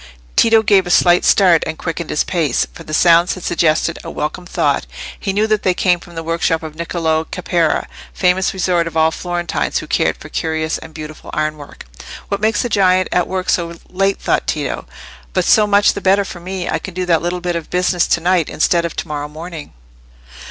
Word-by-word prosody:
Tito 225 -1 +5
gave 195 -3 +3
a - - -4
slight 175 0 +4
start 180 -5 +5
and 160 0 -4
quickened 165 -1 -4
his 150 - +1
pace, 160 -8 0
for - - -11
the - - -10
sounds 170 +2 +4
had 185 - -10
suggested 170 0 +1
a - - -7
welcome 155 +4 -4
thought. - - 0 0.3
He 195 - -2
knew 205 +2 +1
that 215 -1 +1
they 185 -1 +1
came 180 -1 +2
from 175 0 -14
the 165 - -4
workshop 165 0 0
of 155 -1 -7
Niccolò 160 -1 -1
Caparra, 175 -3 0 0.3
famous 185 +1 +1
resort 180 -3 0
of 165 - -5
all 160 0 +4
Florentines 175 0 -2
who - - -3
cared - - 0
for - - -11
curious 160 0 -2
and 160 - -11
beautiful 155 -1 -9
iron 155 0 -1
work. 145 -2 -12 0.4
"What 200 0 -2
makes 220 +4 +1
the - - -1
giant 185 -4 +2
at 180 - +1
work 185 0 -3
so 170 -1 0 0.2
late?" 195 +1 0
thought - - 0
Tito. - - -3 0.5
"But - - +1
so 215 -2 +5
much 205 0 +4
the 200 - -6
better 195 +1 +3
for 180 - -8
me. 185 +1 -5
I - - -1
can 190 - -9
do 185 0 -2
that 170 -2 +2
little 175 +1 -2
bit 175 -1 -2
of 165 -2 -5
business 180 -1 +1
to - - +2
night 175 -2 +2
instead 170 +2 +1
of 170 - -5
to - - -4
morrow 150 -1 -4
morning." 160 0 -8
175 Hz, 215 wpm, -17 LUFS, 160-185 Hz, 0.5 s, Tito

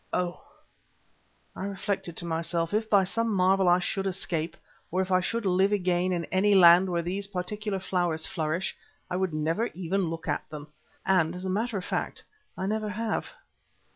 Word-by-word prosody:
Oh! 180 -1 -1 1.1
I 190 - -4
reflected 195 -3 -3
to 175 - -1
myself, 165 +1 -1
if 220 +1 0
by 200 -2 +5
some 230 +4 -1
marvel 190 -1 +3
I 175 - +6
should 195 +2 -1
escape, 175 -4 -2 0.3
or 185 - -1
if 190 0 -1
I 185 - +5
should 225 +4 -2
live 190 +2 +3
again 180 -2 +1
in 170 -2 -1
any 200 +2 +4
land 180 0 +7
where 170 -1 0
these 195 +3 -2
particular 200 +2 -3
flowers 175 -4 0
flourish, 160 +3 -2 0.4
I - - 0
would 190 -1 0
never 160 +9 0
even 185 0 -1
look 165 0 -6
at 145 - -2
them. 150 -1 -8 0.4
And 180 -3 +2
as 180 +1 -6
a 190 - -1
matter 220 +2 -1
of 185 - -5
fact - - -3 0.3
I 190 - -2
never 215 +1 -1
have. 220 +2 -2
185 Hz, 180 wpm, -28 LUFS, 170-200 Hz, 1.1 s, land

